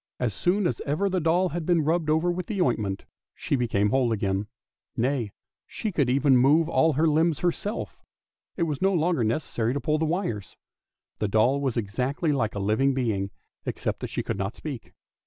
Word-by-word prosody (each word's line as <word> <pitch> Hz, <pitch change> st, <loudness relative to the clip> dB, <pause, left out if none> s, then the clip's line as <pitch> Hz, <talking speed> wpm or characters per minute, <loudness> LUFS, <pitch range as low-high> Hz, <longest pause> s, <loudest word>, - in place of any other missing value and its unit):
As 120 Hz, -4 st, 0 dB
soon 185 Hz, -, +1 dB
as -, -, -1 dB
ever 170 Hz, +8 st, 0 dB
the 185 Hz, -1 st, 0 dB
doll 175 Hz, +3 st, +2 dB
had 170 Hz, -1 st, -3 dB
been 170 Hz, -1 st, +2 dB
rubbed 160 Hz, 0 st, +1 dB
over 160 Hz, +3 st, +2 dB
with 180 Hz, +1 st, -4 dB
the 205 Hz, -3 st, -3 dB
ointment 110 Hz, -, 0 dB, 0.3 s
she -, -, -1 dB
became 105 Hz, -5 st, +1 dB
whole 130 Hz, -2 st, +2 dB
again, 100 Hz, -1 st, -1 dB, 0.5 s
nay, 120 Hz, -3 st, 0 dB, 0.4 s
she 215 Hz, -, -4 dB
could 145 Hz, -8 st, +1 dB
even 135 Hz, +1 st, +4 dB
move 150 Hz, +6 st, +4 dB
all 160 Hz, -1 st, +3 dB
her 155 Hz, +4 st, +2 dB
limbs 160 Hz, 0 st, +2 dB
herself; 190 Hz, +5 st, -2 dB, 0.6 s
it 170 Hz, -, +1 dB
was 150 Hz, -4 st, -2 dB
no 195 Hz, 0 st, +3 dB
longer 165 Hz, -5 st, +1 dB
necessary 115 Hz, 0 st, -1 dB
to -, -, 0 dB
pull 155 Hz, +1 st, 0 dB
the 160 Hz, -, +1 dB
wires. 155 Hz, -, -3 dB, 0.6 s
The 105 Hz, -, 0 dB
doll 120 Hz, +7 st, +2 dB
was 130 Hz, -4 st, -1 dB
exactly 125 Hz, -, -1 dB
like 115 Hz, -7 st, 0 dB
a -, -, -2 dB
living 110 Hz, +7 st, +2 dB
being, 105 Hz, -7 st, -1 dB, 0.3 s
except -, -, -3 dB
that -, -, -5 dB
she -, -, -3 dB
could -, -, -3 dB
not 100 Hz, +3 st, -3 dB
speak. 140 Hz, -7 st, -7 dB
140 Hz, 195 wpm, -26 LUFS, 115-165 Hz, 0.6 s, even